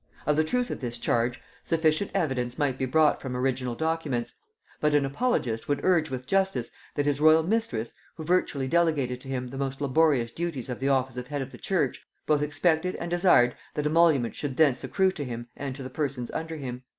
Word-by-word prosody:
Of 150 - +2
the 155 - +3
truth 245 +9 -1
of - - -4
this 120 -2 -4
charge, 120 +1 0 0.2
sufficient 160 +3 +1
evidence 125 -5 -1
might 135 -3 0
be 130 - 0
brought 155 +3 +3
from 125 -2 -4
original 125 -1 -1
documents; 160 -6 -2 0.5
but 150 -1 +2
an 145 -1 +3
apologist 135 - -1
would 145 -1 0
urge 170 -4 +3
with 130 -1 -5
justice 190 -7 0 0.2
that 145 - 0
his 145 0 0
royal 155 +1 +6
mistress, 165 - -1 0.2
who 160 - -7
virtually 155 -5 +1
delegated 145 -6 +1
to 135 - -10
him 130 -2 -3
the 135 +2 -7
most 135 -1 -3
laborious 140 -4 +2
duties 165 -7 -4
of 125 - -4
the 135 +1 0
office 130 -2 +1
of 125 0 -5
head 145 -1 -2
of 135 - -10
the - - -12
church, 190 -3 -1 0.2
both 150 -1 +2
expected 160 +4 +1
and 170 - -5
desired 175 -9 +4 0.2
that 150 - -1
emolument 155 -6 +3
should 140 -3 -4
thence 140 -6 +3
accrue 190 -1 +2
to 150 - -5
him 120 -2 -6
and 135 -2 -5
to 135 - -7
the 130 - -6
persons 135 -4 -3
under 160 0 -4
him. 125 -3 -6
140 Hz, 210 wpm, -27 LUFS, 125-160 Hz, 0.5 s, royal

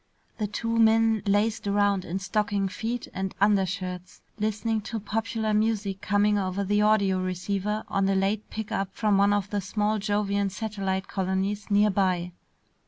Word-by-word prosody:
The 210 - 0
two 230 +2 -2
men 225 -1 +4
lazed 205 +1 +1
around 200 -1 +2
in 175 - -3
stocking 200 0 0
feet 225 +5 -4
and 190 0 -3
undershirts, 190 -3 0 0.2
listening 215 +1 -1
to 225 +2 -4
popular 220 +1 -2
music 210 -2 0
coming 205 0 +2
over 190 +1 -1
the 205 +2 +1
audio 200 -3 +3
receiver 195 +3 -2
on 195 0 +1
a 195 - +2
late 195 +2 0
pickup 200 -3 -4
from 210 -3 +2
one 200 +1 +4
of 205 -1 0
the 205 -1 0
small 210 +2 0
Jovian 205 -1 0
satellite 195 -2 -3
colonies 195 +2 -2
near 205 +1 +4
by. 180 -2 0
205 Hz, 155 wpm, -26 LUFS, 195-215 Hz, 0.2 s, men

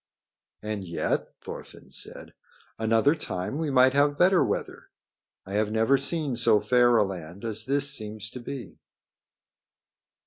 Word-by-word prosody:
"And 105 -2 -4
yet," 85 -2 -2
Thorfinn - - -10
said, - - -5 0.5
"another 115 +6 +3
time 135 - -4
we 160 -2 -1
might 130 -1 +5
have 145 +1 +2
better 185 +1 +4
weather. - - -4 0.6
I 95 - -8
have 105 0 0
never 110 +5 +3
seen 140 0 +2
so 115 -3 +4
fair 120 +2 +4
a 110 - +5
land 95 +1 -7
as 110 0 -2
this 140 +1 0
seems 110 -2 -3
to 125 - -8
be." 120 -3 -8
115 Hz, 140 wpm, -26 LUFS, 105-140 Hz, 0.6 s, might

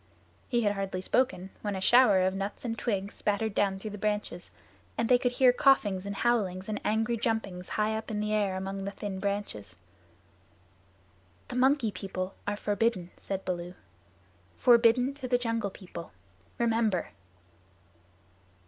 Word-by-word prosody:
He 240 -2 +2
had 205 - +3
hardly 195 -2 -3
spoken 190 -2 0
when 205 -2 -2
a - - -3
shower 210 -2 +6
of 185 - +1
nuts 195 +5 -4
and 225 -1 -2
twigs 200 -4 -2
spattered 210 +1 -1
down 195 -2 +1
through 210 +2 -6
the 210 - -7
branches; 210 -4 -2 0.5
and 230 - +1
they 250 0 +5
could 245 0 0
hear 250 0 +5
coughings 205 -8 +3
and 200 - -4
howlings 195 -6 0
and 215 -1 -3
angry 225 +2 +1
jumpings 215 -6 -2
high 215 +1 +1
up 220 - -5
in 215 -1 -2
the 210 0 -1
air 205 -3 +1
among 195 +1 -4
the 200 - -2
thin 200 -1 -5
branches. 190 - -4 1.7
"The - - -5
Monkey 260 -2 +3
People 185 0 -5
are 205 0 -1
forbidden," 205 -4 0
said 195 -1 -5
Baloo, 175 0 -4 0.8
"forbidden 245 +2 +5
to 275 -2 -6
the 245 0 +3
Jungle 230 -4 -1
People. 180 - -10 0.5
Remember." 225 -5 +1
210 Hz, 155 wpm, -29 LUFS, 190-230 Hz, 1.7 s, shower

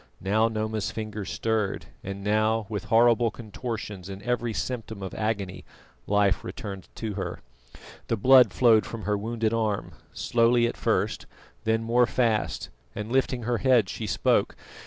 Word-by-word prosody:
Now 110 +4 +2
Noma's 110 -1 -2
fingers 110 -2 -5
stirred, 110 -3 -1 0.2
and 100 +1 -6
now, 110 +1 +2
with 105 -3 -4
horrible 115 +2 +4
contortions 105 -4 -6
and 95 0 -6
every 120 -1 -1
symptom 110 0 -4
of 95 - -5
agony, 105 -4 -2 0.4
life 100 -2 +2
returned 100 -7 -7
to 110 -2 -4
her. - - -4 0.7
The 115 - 0
blood 130 +4 +7
flowed 115 -4 +5
from 115 -2 -7
her 105 +3 +1
wounded 110 +1 -1
arm, 110 -3 -1 0.2
slowly 120 0 +3
at 120 - -1
first, - - -1 0.4
then 110 0 +1
more 120 +1 +3
fast, 115 -4 0 0.3
and 105 +2 -5
lifting 130 -2 +1
her 120 0 0
head 125 -6 +4
she 110 - -4
spoke. - - +1
110 Hz, 150 wpm, -26 LUFS, 105-115 Hz, 0.7 s, blood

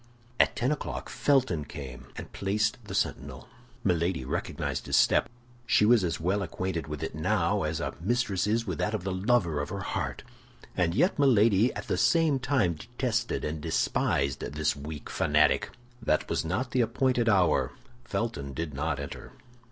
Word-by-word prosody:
At - - +4
ten 125 +4 +1
o'clock 150 - -4
Felton 130 - +2
came 65 -3 -9
and - - -8
placed 105 +2 0
the - - -6
sentinel. - - -2 0.4
Milady 85 -6 0
recognized - - -3
his - - +1
step. - - +4 0.4
She 105 - +4
was 115 -2 +5
as 85 -2 -1
well 95 +5 0
acquainted 90 -5 -3
with 75 -1 -5
it - - -4
now 85 +2 +1
as 80 +1 -1
a - - -3
mistress 100 -2 0
is 115 +2 +1
with 90 -7 -4
that 105 +1 0
of 100 - -4
the 95 - -2
lover 95 -6 +1
of 75 - -4
her 100 +1 -4
heart; - - -3 0.5
and 85 -1 +1
yet 175 - +2
Milady 115 -4 +4
at - - -6
the - - 0
same 160 -5 +3
time 125 -10 +1
detested 120 - -2
and 75 0 -3
despised 70 -3 0
this 75 +1 -1
weak 75 +1 -7
fanatic. - - +2 0.3
That 80 -8 +1
was - - -1
not 100 +10 -2
the 125 - +2
appointed 120 0 +1
hour. 95 -4 +3 0.3
Felton 70 +3 -3
did 80 0 -4
not 70 +1 -2
enter. 70 - -7
95 Hz, 170 wpm, -28 LUFS, 80-115 Hz, 0.5 s, was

